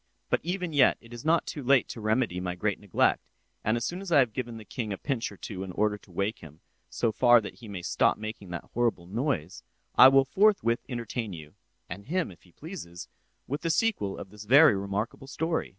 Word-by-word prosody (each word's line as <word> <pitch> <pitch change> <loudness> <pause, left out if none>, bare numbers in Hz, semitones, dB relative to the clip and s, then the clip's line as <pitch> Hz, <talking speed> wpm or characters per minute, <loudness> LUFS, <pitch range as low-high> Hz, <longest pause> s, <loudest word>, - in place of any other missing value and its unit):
But - - +3
even 180 0 -3
yet 140 -3 +5
it 115 0 -15
is 120 - -8
not 165 +2 +2
too 150 - -5
late 135 0 +4
to 115 - -7
remedy 110 -3 0
my 90 -1 -3
great 100 +2 -1
neglect—and 105 +3 -1
as 115 - -2
soon 175 +8 -4
as 195 -3 -7
I 155 - +6
have 125 -6 +4
given 120 -2 -4
the 110 - -11
king 110 +1 -4
a 100 - -3
pinch 125 -4 -2
or 100 - -12
two 95 -1 -7
in 95 -1 -5
order 105 +1 +1
to 95 - -20
wake 100 +5 -2
him 75 -2 -12
up - - -30 0.3
so 115 - 0
far 120 +1 +6
that 105 +1 -8
he 115 - -11
may 95 -4 -6
stop - - +2
making 110 -3 -7
that 85 -2 -7
horrible 115 -7 0
noise, 95 - -2 0.3
I - - +9
will 135 0 +5
forthwith 190 - +3
entertain 115 -3 -4
you 75 -3 -10 0.3
(and 100 +4 -8
him 175 - -1
if 85 - -16
he 90 - -22
pleases) 130 - -9 0.4
with 145 +3 -4
the 165 - -1
sequel 165 - 0
of 95 - -9
this 105 0 -11
very 140 +2 +7
remarkable 100 +6 -3
story." 160 +3 -2
115 Hz, 225 wpm, -28 LUFS, 100-135 Hz, 0.4 s, I